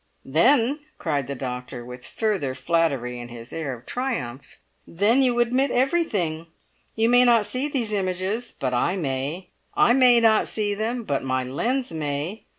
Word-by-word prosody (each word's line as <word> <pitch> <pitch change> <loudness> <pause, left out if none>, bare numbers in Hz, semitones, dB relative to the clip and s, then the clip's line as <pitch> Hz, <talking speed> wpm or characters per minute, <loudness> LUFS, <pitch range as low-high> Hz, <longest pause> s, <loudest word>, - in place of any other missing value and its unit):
"Then," 245 - +3 0.2
cried 145 -6 -2
the 140 - -4
doctor, 125 -1 -6
with 125 0 -9
further 195 - -1
flattery 135 -5 0
in 120 - -7
his 120 0 -11
air 160 -4 -3
of 120 +1 -16
triumph, 145 - -4 0.3
"then 210 +10 +2
you 245 -2 +2
admit 250 +3 +2
everything! 235 - 0 0.5
You 225 0 +2
may 245 +1 +6
not 235 -3 +4
see 255 +6 -2
these 245 -7 -2
images, 190 +4 -2
but 130 -2 -3
I 170 +9 +1
may. 145 +2 -3 0.3
I 240 - +5
may 250 -2 +7
not 225 -2 +4
see 210 -2 -1
them, 230 +4 -2
but 140 -9 -2
my 130 -1 -1
lens 240 - -1
may! 155 +6 -4
185 Hz, 160 wpm, -24 LUFS, -, 0.5 s, may